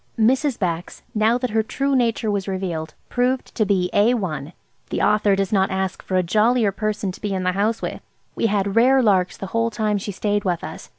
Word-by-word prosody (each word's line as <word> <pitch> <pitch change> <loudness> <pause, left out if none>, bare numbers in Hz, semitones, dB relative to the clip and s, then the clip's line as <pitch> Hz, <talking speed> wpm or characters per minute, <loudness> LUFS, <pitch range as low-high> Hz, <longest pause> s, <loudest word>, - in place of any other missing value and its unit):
Mrs. 255 +4 +2
Bax, 175 -2 -3
now 220 +2 +3
that 250 -2 -3
her 220 +1 +2
true 275 +5 -1
nature 230 -3 +1
was 200 -1 -2
revealed, 175 -5 -3
proved 250 +1 0
to 215 -3 0
be 185 -3 +1
A1. 190 - +1 0.4
The - - -2
author 210 -1 +3
does 195 +1 -1
not 190 -1 +3
ask 190 0 -2
for 190 - -4
a 185 - +2
jollier 215 +4 +2
person 205 0 -2
to - - -13
be 200 -2 -2
in 185 - -2
the 185 - +2
house 210 +4 -1
with. - - -4 0.3
We - - +1
had 200 -2 0
rare 255 +3 +5
larks 190 -4 +2
the - - -5
whole 230 0 +2
time 210 -1 -1
she 205 - -5
stayed 205 +1 -1
with 180 -4 -1
us. 160 - -8
205 Hz, 215 wpm, -22 LUFS, 190-230 Hz, 0.4 s, rare